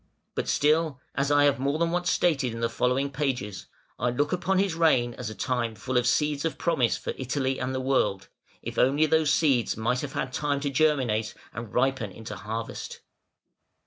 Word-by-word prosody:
But - - -3
still, 155 -1 +2
as 140 +1 0
I 145 0 +5
have 140 -2 +3
more 140 +3 0
than 165 +1 +1
once 180 0 0
stated 135 -8 +1
in - - -6
the 115 0 0
following 130 +4 0
pages, 125 -9 -3 0.3
I 125 - +1
look 145 +6 0
upon 185 +1 0
his 195 -2 +2
reign 155 -8 +3
as 120 -3 -5
a 110 - -8
time 120 -4 -1
full 125 +5 -5
of 125 0 +3
seeds 150 +2 +1
of 165 - -2
promise 145 -9 +1
for - - -4
Italy 130 +1 -1
and 130 +1 -2
the - - -1
world, 115 -7 0 0.4
if - - -4
only 140 +5 +4
these 155 -1 +3
seeds 135 -10 +2
might 120 +3 0
have 140 -2 -5
had 130 - -3
time 145 -1 0
to 140 -1 -1
germinate 130 -8 +1 0.2
and 115 -1 -7
ripen 125 -5 0
into 110 +4 -8
harvest. 115 +1 -6
135 Hz, 195 wpm, -27 LUFS, 120-150 Hz, 0.4 s, I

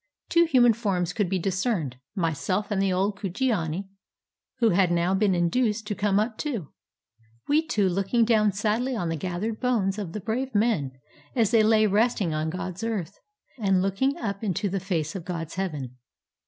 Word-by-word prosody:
Two 340 0 +5
human 245 -7 +5
forms 190 -6 -1
could 200 -2 0
be 190 - +1
discerned, 185 - -1 0.2
myself 185 +4 -1
and 195 -2 +1
the 195 -1 +2
old 195 +2 0
Kujiani, 195 -4 -1 0.7
who 230 -3 +3
had 180 -1 +3
now 175 +2 +2
been 195 -1 +2
induced 210 +5 +1
to 210 - -2
come 205 0 +1
up 220 +1 -2
too; 235 - -3 0.8
we 310 +2 +2
two 205 -8 +2
looking 195 +6 +1
down 215 -2 +3
sadly 220 +6 0
on 175 -7 -2
the 165 - -1
gathered 185 +7 -3
bones 215 -6 0
of 180 -5 -5
the 215 - -3
brave 240 +5 -3
men, 205 - +2 0.4
as 230 -4 +2
they 230 -2 +5
lay 215 0 +4
resting 210 -4 +2
on 155 +1 -1
God's 185 +2 -5
earth, 205 -5 -3 0.4
and 195 -3 +2
looking 230 +9 0
up 200 -2 -4
into 205 0 -1
the 195 +1 -1
face 170 -5 -2
of 185 - -5
God's 165 -2 -5
heaven. 150 -10 -4
200 Hz, 180 wpm, -26 LUFS, 180-225 Hz, 0.8 s, Two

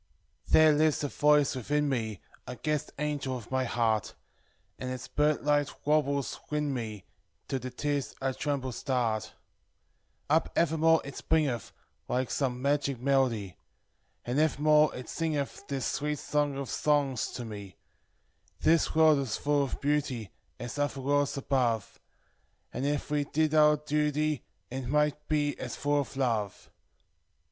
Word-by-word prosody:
Thick 155 -1 +6
;•: - - +1
lives 155 -1 +2
a 145 - -1
voice 150 -1 +3
within 145 +4 0
me, 110 -7 -2 0.3
i 125 - -5
gu 155 - -3
‚ñÝ‚Ä¢. 150 -2 -1
nigel 145 -3 -2
of 120 0 -12
my 130 0 +1
heart, 115 -3 0 0.6
And 130 - -4
its 130 0 -5
bird 150 0 +1
like 145 -1 +3 0.2
warbles 140 -2 +1
win 150 -1 -1
me, 110 -6 -5 0.4
till 135 - -1
the 130 - -6
u - - -6
irs 145 -1 -2
a 135 0 -1
tremble 140 -2 -2
sunt; 115 -4 -1 0.9
Up 160 +3 +2
evermore 160 0 +3
it 140 - -8
springeth, 145 -9 0 0.4
like 125 0 -1
some 130 -2 -1
magic 140 -2 +1
melody, 125 -8 +1 0.7
A 120 - -4
id 135 - +1
evermore 150 0 +4
it 125 - -7
siugeth 155 +3 -3
this 135 -1 -2
a - - -2
>ngs 145 -2 0
to 125 - -4
m 100 -4 -8 0.9
"This 165 0 +3
world 155 -2 +6
is 130 -6 -2
full 145 0 +1
of 135 - -5
beauty, 140 - -1 0.3
is 120 +3 -6
other 145 -1 -1
worlds 140 +1 +1
above: 125 -6 0 0.7
And, 135 +3 -1
if 145 0 -2
we 145 -1 +1
did 155 +1 0
our 150 -1 +6
duty, 150 0 0 0.3
it 130 -1 -4
might 150 +2 +1
be 145 -2 +1
as 125 - -5
full 145 +1 +1
of 135 0 -8
love." 115 -7 -1
140 Hz, 150 wpm, -29 LUFS, 125-150 Hz, 0.9 s, Thick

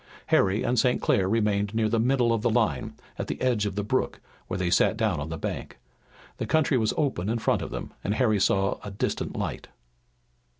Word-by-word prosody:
Harry 100 +3 +3
and 120 0 +1
St. 125 +1 +2
Clair 95 -1 +2
remained 105 -1 +1
near 110 -1 +2
the 115 +1 +1
middle 120 0 +2
of 115 - 0
the 120 - +2
line, 110 - 0 0.2
at - - -3
the - - -4
edge 120 -5 +1
of 100 - -4
the 105 - -1
brook, 105 - -1 0.3
where 90 - -3
they 90 -2 -1
sat 110 - +3
down 110 -8 +1
on 75 +2 -4
the 80 - -4
bank. - - -5 0.6
The - - -3
country 155 -3 +2
was 110 -1 +1
open 130 - 0
in 115 - 0
front 115 - +1
of - - -5
them, - - -6
and 100 - 0
Harry 110 -4 +2
saw 95 0 +2
a 105 - -5
distant 100 - -3
light. - - -4
110 Hz, 215 wpm, -26 LUFS, 100-120 Hz, 0.6 s, Harry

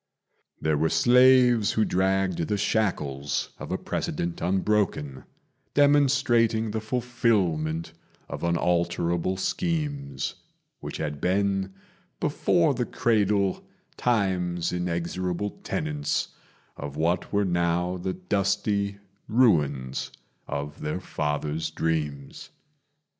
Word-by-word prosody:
There 80 -2 +1
were 80 +1 +2
slaves 125 -2 +5
who 110 - +2
dragged 95 -2 +1
the 105 - 0
shackles 75 - -1
of - - -7
a - - 0
precedent 85 0 -3
unbroken, 95 -7 0 0.5
Demonstrating 135 -6 +3
the 110 +1 -2
fulfilment 105 -10 0 0.3
of - - -6
unalterable 85 +1 0
schemes, 145 - -2 0.5
Which - - -6
had 75 -2 -4
been, 95 +1 0 0.4
before - - +2
the - - -2
cradle, 100 -4 +1 0.3
Time's 90 -7 0
inexorable 90 +2 -2
tenants 75 -1 -2 0.5
Of 70 0 -7
what 85 +3 0
were 100 0 +2
now 90 0 0
the 90 +1 -3
dusty 100 +2 0 0.3
ruins 75 - +2 0.4
of 70 +1 -5
their 75 +4 -2
father's 75 -2 -2
dreams. 75 -4 -3
95 Hz, 95 wpm, -26 LUFS, 80-110 Hz, 0.5 s, slaves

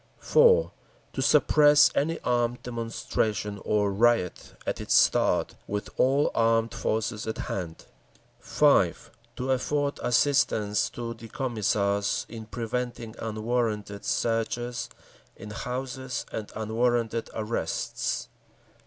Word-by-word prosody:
4. 475 +1 +4 0.4
To - - -2
suppress 150 -1 +5
any 165 +3 0
armed 120 0 0
demonstration 110 -3 -2
or 105 -2 +1
riot 115 -3 +1
at - - -3
its - - +1
start, - - +3
with 105 0 -3
all 135 +3 +3
armed 115 0 +2
forces 110 0 -2
at 110 - -3
hand. 85 -4 -5 0.5
5. - - +2 0.2
To 130 +1 -2
afford 140 +2 0
assistance 115 -5 +2
to 115 -1 -5
the 115 0 -11
Commissars 100 -5 0
in 110 -1 -9
preventing 120 0 -4
unwarranted 110 -2 -2
searches 120 +1 -1 0.5
in 105 - -9
houses 130 +3 -4
and 110 -2 -5
unwarranted 115 +1 0
arrests. 110 +1 -2
115 Hz, 105 wpm, -27 LUFS, 110-125 Hz, 0.5 s, suppress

